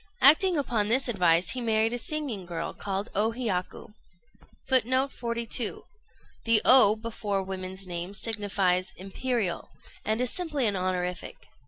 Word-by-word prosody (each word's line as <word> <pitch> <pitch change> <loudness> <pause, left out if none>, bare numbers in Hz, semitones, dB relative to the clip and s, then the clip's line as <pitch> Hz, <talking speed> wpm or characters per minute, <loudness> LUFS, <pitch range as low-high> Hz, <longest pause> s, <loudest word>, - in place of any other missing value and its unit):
Acting 325 +5 +6
upon 230 -7 0
this 260 +5 +2
advice, 180 -6 +2
he 255 - -4
married 225 0 +1
a 245 - -2
singing 250 - -3
girl, 170 -1 -5
called 200 +2 -4
O 220 +3 +1
Hiyaku. 210 -4 -4 0.7
[Footnote 260 +1 +3
42: 235 -1 -2 0.6
The 230 -1 +4
O 250 -5 +7
before 215 -3 -3
women's 190 0 -6
names 180 +2 -5
signifies 195 -4 0
"Imperial," 195 0 -3 0.3
and 220 +2 -1
is 250 -1 +1
simply 305 -7 -2
an 205 -2 0
honorific. 180 -1 -4
215 Hz, 135 wpm, -27 LUFS, 190-245 Hz, 0.7 s, O